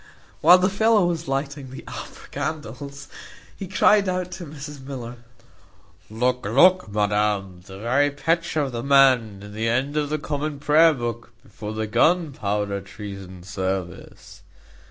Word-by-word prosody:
While 175 Hz, +4 st, +8 dB
the 185 Hz, 0 st, +2 dB
fellow 210 Hz, 0 st, +3 dB
was 170 Hz, -1 st, -2 dB
lighting 135 Hz, 0 st, -3 dB
the 130 Hz, -, -9 dB
upper -, -, -9 dB
candles, 140 Hz, -2 st, -5 dB, 0.5 s
he 195 Hz, -, -7 dB
cried 200 Hz, +1 st, +4 dB
out 180 Hz, 0 st, -2 dB
to 175 Hz, -2 st, -7 dB
Mrs 145 Hz, -1 st, -9 dB
Miller, 125 Hz, -3 st, -7 dB, 0.9 s
"Look, 125 Hz, +3 st, 0 dB
look, 155 Hz, -, +4 dB
madam, 105 Hz, -3 st, 0 dB
the 95 Hz, 0 st, -11 dB
very 130 Hz, +7 st, +2 dB
picture 165 Hz, +2 st, 0 dB
of 140 Hz, -2 st, -2 dB
the 120 Hz, -1 st, -4 dB
man 130 Hz, -7 st, +4 dB
in 105 Hz, 0 st, -10 dB
the 110 Hz, +2 st, -1 dB
end 135 Hz, +5 st, 0 dB
of 145 Hz, -1 st, 0 dB
the 155 Hz, -, 0 dB
common 145 Hz, 0 st, -3 dB
prayer 155 Hz, +3 st, +5 dB
book 120 Hz, -2 st, -5 dB
before 105 Hz, -1 st, -8 dB
the 110 Hz, 0 st, -2 dB
gunpowder 105 Hz, -, 0 dB
treason 100 Hz, -3 st, -9 dB
service." 95 Hz, 0 st, -5 dB
135 Hz, 145 wpm, -23 LUFS, 105-155 Hz, 0.9 s, While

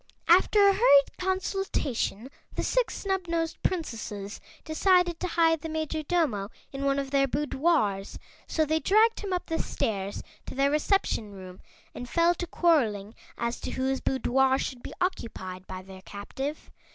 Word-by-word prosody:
After 365 Hz, +5 st, +5 dB
a 395 Hz, -, +6 dB
hurried 285 Hz, -, +5 dB
consultation 365 Hz, -, -2 dB, 0.2 s
the -, -, -1 dB
Six -, -, +1 dB
Snubnosed 340 Hz, -4 st, -1 dB
Princesses 220 Hz, -, -3 dB, 0.2 s
decided 350 Hz, +1 st, +2 dB
to 365 Hz, -, -2 dB
hide 325 Hz, -2 st, +2 dB
the 320 Hz, -, -5 dB
Majordomo 310 Hz, -, -1 dB, 0.2 s
in 275 Hz, 0 st, -4 dB
one 275 Hz, 0 st, +2 dB
of 275 Hz, -1 st, -3 dB
their 275 Hz, -1 st, +3 dB
boudoirs, 275 Hz, -, 0 dB, 0.3 s
so 315 Hz, -, +1 dB
they 315 Hz, +1 st, +1 dB
dragged 435 Hz, +6 st, +3 dB
him 400 Hz, -2 st, -5 dB
up 360 Hz, -1 st, -1 dB
the 325 Hz, -1 st, -2 dB
stairs 200 Hz, -2 st, -3 dB, 0.2 s
to -, -, -7 dB
their 275 Hz, +1 st, +2 dB
reception 300 Hz, -, 0 dB
room 185 Hz, -1 st, -11 dB, 0.3 s
and 245 Hz, 0 st, -7 dB
fell 335 Hz, +3 st, +3 dB
to 350 Hz, 0 st, -5 dB
quarreling 225 Hz, -, +1 dB, 0.2 s
as 235 Hz, 0 st, -2 dB
to -, -, -5 dB
whose 265 Hz, +1 st, -1 dB
boudoir 265 Hz, 0 st, +2 dB
should 255 Hz, -2 st, -4 dB
be -, -, -9 dB
occupied 185 Hz, -, -4 dB
by 185 Hz, 0 st, -7 dB
their 190 Hz, 0 st, -12 dB
captive. 265 Hz, +10 st, -6 dB
285 Hz, 150 wpm, -27 LUFS, 230-345 Hz, 0.3 s, a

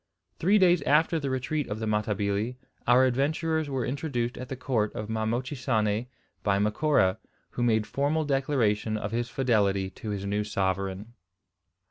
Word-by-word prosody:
Three 195 Hz, +6 st, +4 dB
days 180 Hz, -3 st, +5 dB
after 160 Hz, +3 st, +3 dB
the 140 Hz, -2 st, -3 dB
retreat 130 Hz, +3 st, -1 dB
of 105 Hz, -, -4 dB
the 110 Hz, -, -3 dB
Matabili 105 Hz, +1 st, -1 dB, 0.3 s
our 125 Hz, +2 st, +6 dB
adventurers 155 Hz, +4 st, 0 dB
were 130 Hz, -4 st, -1 dB
introduced 125 Hz, -3 st, -2 dB
at 125 Hz, 0 st, -7 dB
the 135 Hz, -, -3 dB
court 120 Hz, -5 st, 0 dB
of 105 Hz, -, -5 dB
Ma 110 Hz, 0 st, -1 dB
Mochisane 120 Hz, -3 st, -1 dB, 0.3 s
by 100 Hz, -1 st, +2 dB
Macora, 105 Hz, -1 st, +2 dB, 0.3 s
who -, -, -4 dB
made 110 Hz, -3 st, +2 dB
formal 145 Hz, +6 st, 0 dB
declaration 125 Hz, -7 st, +1 dB
of 100 Hz, -1 st, -4 dB
his 120 Hz, +1 st, -1 dB
fidelity 100 Hz, -7 st, +1 dB
to 110 Hz, -, -8 dB
his 100 Hz, -1 st, -3 dB
new 105 Hz, +1 st, 0 dB
sovereign. 100 Hz, +1 st, -2 dB
120 Hz, 155 wpm, -27 LUFS, 105-140 Hz, 0.3 s, our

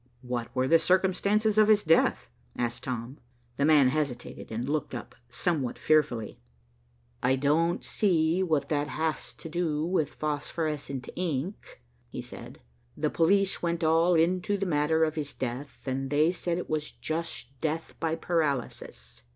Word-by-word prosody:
"What 125 Hz, -2 st, -3 dB
were 130 Hz, 0 st, +2 dB
the 165 Hz, +3 st, +6 dB
circumstances 200 Hz, +5 st, +2 dB
of 215 Hz, -, +6 dB
his 215 Hz, -1 st, +5 dB
death?" 160 Hz, +1 st, +3 dB, 0.3 s
asked 120 Hz, -1 st, -2 dB
Tom. 125 Hz, +1 st, -4 dB, 0.4 s
The 140 Hz, -, +2 dB
man 150 Hz, -4 st, +6 dB
hesitated 135 Hz, -6 st, -3 dB
and 115 Hz, +3 st, -3 dB
looked 145 Hz, -3 st, -2 dB
up 120 Hz, -, -7 dB, 0.2 s
somewhat 135 Hz, 0 st, -1 dB
fearfully. 125 Hz, -8 st, +1 dB, 0.8 s
"I 130 Hz, +1 st, +3 dB
don't 155 Hz, +5 st, +1 dB
see 170 Hz, -3 st, +2 dB
what 155 Hz, -6 st, 0 dB
that 145 Hz, -1 st, 0 dB
has 155 Hz, -1 st, -2 dB
to -, -, -9 dB
do 160 Hz, -2 st, -1 dB
with 165 Hz, -4 st, 0 dB
phosphorescent 150 Hz, -2 st, -3 dB
ink," 165 Hz, -, -4 dB, 0.3 s
he -, -, -7 dB
said. -, -, -9 dB, 0.4 s
"The -, -, 0 dB
police 195 Hz, +3 st, +2 dB
went 170 Hz, -1 st, -1 dB
all 165 Hz, +2 st, +4 dB
into 180 Hz, +4 st, +2 dB
the 195 Hz, -, -2 dB
matter 160 Hz, -1 st, +2 dB
of 155 Hz, -1 st, +1 dB
his 150 Hz, -2 st, -4 dB
death, 130 Hz, +2 st, -5 dB
and 135 Hz, 0 st, -2 dB
they 150 Hz, +4 st, +3 dB
said 175 Hz, -1 st, -2 dB
it 180 Hz, -, -4 dB
was 155 Hz, -1 st, -2 dB
just 165 Hz, +1 st, -4 dB
death 160 Hz, +1 st, -2 dB
by 165 Hz, -1 st, 0 dB
paralysis." 140 Hz, -, -2 dB
155 Hz, 150 wpm, -28 LUFS, 135-170 Hz, 0.8 s, the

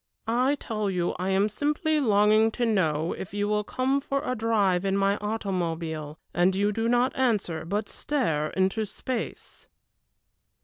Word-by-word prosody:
"I 250 Hz, +5 st, +2 dB
tell 215 Hz, -6 st, -3 dB
you 180 Hz, -2 st, 0 dB
I 185 Hz, +1 st, -1 dB
am 195 Hz, +2 st, +3 dB
simply 300 Hz, +7 st, 0 dB
longing 215 Hz, -2 st, +4 dB
to 245 Hz, -, 0 dB
know 165 Hz, -7 st, +1 dB
if 190 Hz, -, -7 dB
you 205 Hz, 0 st, 0 dB
will 210 Hz, 0 st, +1 dB
come 260 Hz, +5 st, 0 dB
for 275 Hz, 0 st, -2 dB
a 255 Hz, -, 0 dB
drive 210 Hz, -5 st, +1 dB
in 195 Hz, 0 st, +1 dB
my 200 Hz, 0 st, +2 dB
automobile, 170 Hz, -7 st, -3 dB, 0.2 s
and 180 Hz, +2 st, +3 dB
you 205 Hz, +2 st, +2 dB
do 225 Hz, +2 st, -1 dB
not 245 Hz, +2 st, +2 dB
answer, 205 Hz, -, 0 dB
but 205 Hz, +5 st, -2 dB
stare 160 Hz, -, -1 dB
into 190 Hz, +4 st, 0 dB
space." 245 Hz, +4 st, -6 dB
210 Hz, 160 wpm, -26 LUFS, 185-235 Hz, 0.2 s, longing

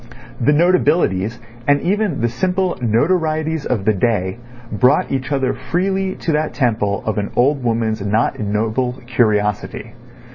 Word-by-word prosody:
The 135 Hz, +5 st, +3 dB
notabilities 150 Hz, -, +2 dB, 0.3 s
and 145 Hz, 0 st, +4 dB
even 190 Hz, -, 0 dB
the 120 Hz, -, +2 dB
simple 185 Hz, +9 st, -1 dB
notorieties 155 Hz, +5 st, 0 dB
of 105 Hz, -6 st, -1 dB
the 110 Hz, -, +4 dB
day 100 Hz, -1 st, 0 dB, 0.3 s
brought 125 Hz, +7 st, +2 dB
each 135 Hz, 0 st, -2 dB
other 135 Hz, -2 st, +1 dB
freely 190 Hz, +2 st, -1 dB
to 165 Hz, -, 0 dB
that 150 Hz, -4 st, -1 dB
temple 110 Hz, -6 st, 0 dB
of 110 Hz, -1 st, -1 dB
an 100 Hz, -, -3 dB
old 135 Hz, +2 st, +2 dB
woman's 115 Hz, -2 st, 0 dB
not 105 Hz, +4 st, 0 dB
ignoble 110 Hz, +4 st, -1 dB
curiosity. 105 Hz, -4 st, 0 dB
125 Hz, 140 wpm, -18 LUFS, 110-155 Hz, 0.3 s, and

